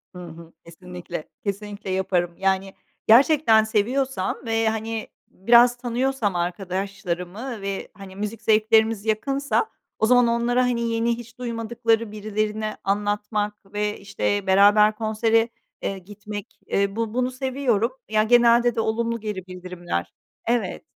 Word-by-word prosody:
Hı 180 0 -8
hı, 165 0 -12
kesinlikle, 175 -1 -8
kesinlikle 205 0 -5
yaparım. 180 -2 0
Yani, 195 0 0 0.3
gerçekten 235 -1 +6
seviyorsam 245 +5 0
ve, 225 -1 +1
hani, 220 0 -3 0.2
biraz 240 +5 +5
tanıyorsam 245 -3 -1
arkadaşlarımı 190 +4 -4
ve, 195 0 -4
hani, 195 -1 -11
müzik 210 +3 -5
zevklerimiz 220 0 +3
yakınsa 275 - 0 0.3
o - - +3
zaman 245 +1 +5
onlara, 235 +2 +2
hani, 245 -1 0
yeni 230 0 0
hiç 235 0 -12
duymadıkları 230 -2 -1
birilerini 215 0 -2
anlatmak 205 +1 -1 0.2
ve, 210 0 -1
işte, 200 0 -2
beraber 205 +2 +5
konsere, 225 +1 +1 0.3
eee, 195 - -3
gitmek, 205 +2 -9
eee, 200 0 0
bu 225 -1 -2
bunu 250 +1 0
seviyorum. 255 -3 0 0.2
Ya, 215 0 +3
genelde 240 +1 +4
de 225 - +1
olumlu 230 +1 -1
geri 210 -4 -5
bildirimler 175 - -5 0.3
Evet. 230 -6 -1
215 Hz, 125 wpm, -23 LUFS, 195-235 Hz, 0.3 s, gerçekten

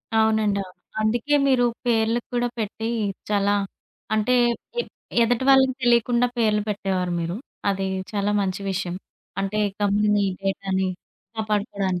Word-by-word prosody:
అవునండి. 220 -2 +3
అవును. 185 - -15 0.3
అందుకే 240 +7 +1
మీరు 255 -2 +4 0.2
పేర్లుకు 230 0 +1
కూడా 245 0 +2
పెట్టి, 220 +1 -3 0.4
చాలా 200 -1 +2 0.6
అంటే, 215 +3 +2 0.5
ఎప్ - - -13 0.3
ఎదుటివాళ్ళకి 260 +2 +4
తెలియకుండా 240 0 +3
పేర్లు 215 -2 +2
పెట్టేవారు 190 -3 -1
మీరు. 170 +2 -2 0.3
అది 195 -1 -1 0.3
చాలా 205 0 0
మంచి 190 0 -2
విషయం. 180 -2 -2 0.5
అంటే, 195 +2 -1 0.2
కంపెనీ 205 0 +3 0.2
డేటాని 195 -1 -1 0.5
కాపాడుకోడానికి. 205 -4 -1
210 Hz, 115 wpm, -24 LUFS, 195-230 Hz, 0.6 s, మీరు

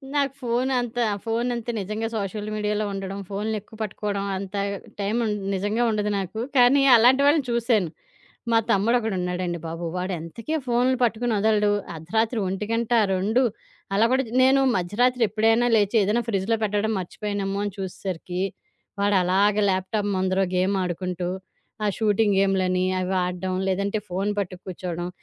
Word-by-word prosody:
నాకు 280 -2 +1
ఫోన్ 245 +2 0
అంతా 245 0 -1 0.2
ఫోన్ 230 +2 -1
అంటే 235 0 -3
నిజంగా 215 +3 -3
సోషల్ 210 0 -3
మీడియాలో 210 0 -1
ఉండడం, 195 0 -5
ఫోన్లు 210 +2 -2
ఎక్కువ 220 +2 -16
పట్టుకోవడం 205 -1 -3
అంత 195 +1 -6 0.4
టైం 200 +2 -1
ఉండ్ 210 -1 -1 0.2
నిజంగా 205 +5 0
ఉండదు 210 -1 0
నాకు. 195 +3 -5 0.2
కానీ 250 +3 +6
అలాంటి 250 +4 +5
వాళ్లని 290 -1 +4
చూశాను. 230 -6 +1 0.6
మా 225 - +6
తమ్ముడు 220 +4 +3
ఒకడున్నాడండి 180 -5 -2
బాబు. 165 +1 -5
వాడు 185 +1 -2
ఎంతకీ 230 - -5
ఫోన్లు 250 +2 +2
పట్టుకొని 235 0 +1
వదలడు. 210 0 +3 0.2
అర్ధరాత్రి 220 +9 -1
1 220 +5 -2 0.2
2 210 +7 +2 0.5
అలా 215 - +4
కూడా 265 0 +2 0.2
నేను 265 +1 +5 0.2
మధ్యరాత్రి 235 +7 +1
ఎప్పుడైనా 225 +3 +3
లేచి 210 +1 +2
ఏదైనా 215 +5 +1
ఫ్రిడ్జ్‌లో 210 +1 +1
పెట్టడం 210 +1 0
మర్చిపోయానేమో 200 +1 -3
అని 205 - -3
చూసేసరికి, 185 -1 -5 0.6
వాడలాగా 200 +1 +3
ల్యాప్‌టాప్ 195 +3 -1
ముందర 185 0 +1 0.2
గేమ్ 190 +2 +2
ఆడుకుంటూ 180 0 -3 0.6
ఆ - - +2
షూటింగ్ 210 -1 +2
గేమ్లని 185 -2 +2 0.2
అవి 185 +1 -1
ఆడడం, 180 +1 -3
లేదంటే 200 +3 0
ఫోను 195 +3 -1
పట్టుక్కుర్చోడం. 180 -2 -4
205 Hz, 140 wpm, -24 LUFS, 190-225 Hz, 0.6 s, కానీ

